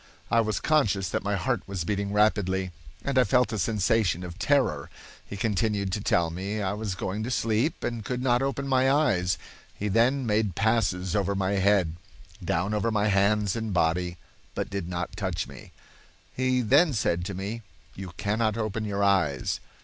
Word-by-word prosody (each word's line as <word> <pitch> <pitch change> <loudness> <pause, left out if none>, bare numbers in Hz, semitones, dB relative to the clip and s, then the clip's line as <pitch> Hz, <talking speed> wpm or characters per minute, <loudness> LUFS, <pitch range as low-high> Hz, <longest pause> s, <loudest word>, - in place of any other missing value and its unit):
I 115 - +5
was 110 -2 -1
conscious 100 -12 +1
that - - -1
my 100 0 -1
heart 120 +1 -1
was 95 -3 -3
beating 100 +2 -2
rapidly, 95 -3 +1 0.3
and 140 -2 +2
I - - +6
felt 125 -2 +2
a 110 - -2
sensation 105 -3 +1
of 90 +2 -8
terror. 115 - +1 0.3
He 100 - -8
continued 100 -1 0
to 105 - -2
tell 85 -4 +1
me 100 +5 -4
I 100 -1 -1
was 105 -3 -3
going 95 +3 -3
to 115 - -3
sleep, 115 +4 0
and 120 -2 -3
could 125 +3 -3
not 125 -1 +2
open 140 0 -2
my 130 0 +3
eyes. 95 - +2 0.4
He 105 - -3
then 120 +6 +2
made 105 -4 +1
passes 95 -5 +1
over 100 -1 +1
my 95 0 0
head, 100 -4 +2 0.5
down 90 +5 0
over 105 +2 +1
my 105 -1 +1
hands 100 0 +2
and 110 -4 -3
body, 90 +1 +1 0.4
but - - -3
did 100 -3 -3
not 90 +1 -4
touch 95 -5 -2
me. - - -12 0.6
He 130 0 +1
then 140 +7 +4
said 90 -6 0
to 100 - -4
me, 100 +5 -4 0.3
'You 95 -2 -8
cannot 110 +1 0
open 110 -1 -2
your 100 -1 -1
eyes. 90 -9 +1
105 Hz, 180 wpm, -27 LUFS, 95-115 Hz, 0.6 s, I